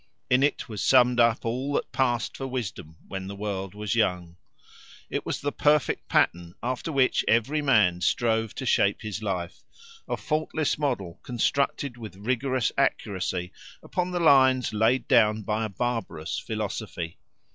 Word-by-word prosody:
In 125 Hz, +1 st, +5 dB
it 145 Hz, 0 st, +1 dB
was 105 Hz, -4 st, -4 dB
summed 125 Hz, -2 st, +5 dB
up 115 Hz, 0 st, +3 dB
all 130 Hz, +5 st, -2 dB
that -, -, -1 dB
passed 120 Hz, -3 st, 0 dB
for 135 Hz, -, -4 dB
wisdom 100 Hz, -11 st, -5 dB
when 95 Hz, -1 st, -5 dB
the 100 Hz, -, -6 dB
world 100 Hz, -1 st, -4 dB
was 105 Hz, 0 st, -2 dB
young. 90 Hz, -6 st, 0 dB, 0.8 s
It -, -, -3 dB
was -, -, -2 dB
the 145 Hz, -, -1 dB
perfect 150 Hz, 0 st, +1 dB
pattern 85 Hz, +1 st, +1 dB
after 125 Hz, +6 st, -2 dB
which 135 Hz, -3 st, +2 dB
every 125 Hz, +7 st, +2 dB
man 105 Hz, -11 st, +3 dB
strove 110 Hz, +1 st, +1 dB
to 130 Hz, -, -5 dB
shape 100 Hz, -4 st, +2 dB
his 105 Hz, -1 st, -4 dB
life; 90 Hz, -4 st, -4 dB, 0.5 s
a -, -, -2 dB
faultless 155 Hz, -1 st, -1 dB
model 100 Hz, -, -2 dB
constructed 130 Hz, +1 st, -1 dB
with 110 Hz, -6 st, -9 dB
rigorous 125 Hz, +3 st, 0 dB
accuracy 90 Hz, -2 st, -1 dB, 0.3 s
upon 180 Hz, 0 st, -2 dB
the 180 Hz, -1 st, -2 dB
lines 130 Hz, -6 st, +4 dB
laid 115 Hz, +3 st, +2 dB
down 110 Hz, -4 st, +4 dB
by 110 Hz, +2 st, -1 dB
a -, -, -4 dB
barbarous 100 Hz, -7 st, -3 dB
philosophy. 85 Hz, -1 st, -5 dB
115 Hz, 155 wpm, -26 LUFS, 100-130 Hz, 0.8 s, In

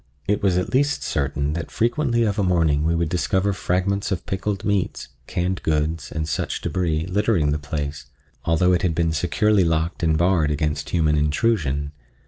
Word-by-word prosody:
It 105 Hz, +1 st, +1 dB
was 95 Hz, -3 st, +2 dB
at 90 Hz, -, -2 dB
least 145 Hz, +3 st, +2 dB
certain 70 Hz, 0 st, -1 dB
that 85 Hz, +1 st, -4 dB
frequently 120 Hz, 0 st, +1 dB
of 105 Hz, -1 st, 0 dB
a -, -, +2 dB
morning 80 Hz, -5 st, +2 dB
we 80 Hz, +1 st, +1 dB
would 85 Hz, 0 st, +1 dB
discover 95 Hz, +4 st, 0 dB
fragments 95 Hz, +2 st, -1 dB
of 95 Hz, -, -2 dB
pickled 95 Hz, +1 st, -3 dB
meats, 100 Hz, -3 st, -1 dB, 0.2 s
canned 90 Hz, +1 st, -2 dB
goods 75 Hz, -1 st, -1 dB
and 80 Hz, 0 st, -3 dB
such 75 Hz, -, -2 dB
débris, 85 Hz, -3 st, -1 dB
littering 95 Hz, -5 st, +1 dB
the 75 Hz, -, -1 dB
place, 75 Hz, -2 st, -5 dB, 0.4 s
although 90 Hz, +2 st, +3 dB
it 90 Hz, -, +2 dB
had 85 Hz, -3 st, 0 dB
been 80 Hz, -1 st, +1 dB
securely 100 Hz, +4 st, +2 dB
locked 80 Hz, 0 st, 0 dB
and 80 Hz, -2 st, +2 dB
barred 85 Hz, -3 st, +2 dB
against 75 Hz, -1 st, -1 dB
human 80 Hz, -3 st, +2 dB
intrusion. 75 Hz, -, 0 dB
85 Hz, 175 wpm, -22 LUFS, 75-95 Hz, 0.4 s, although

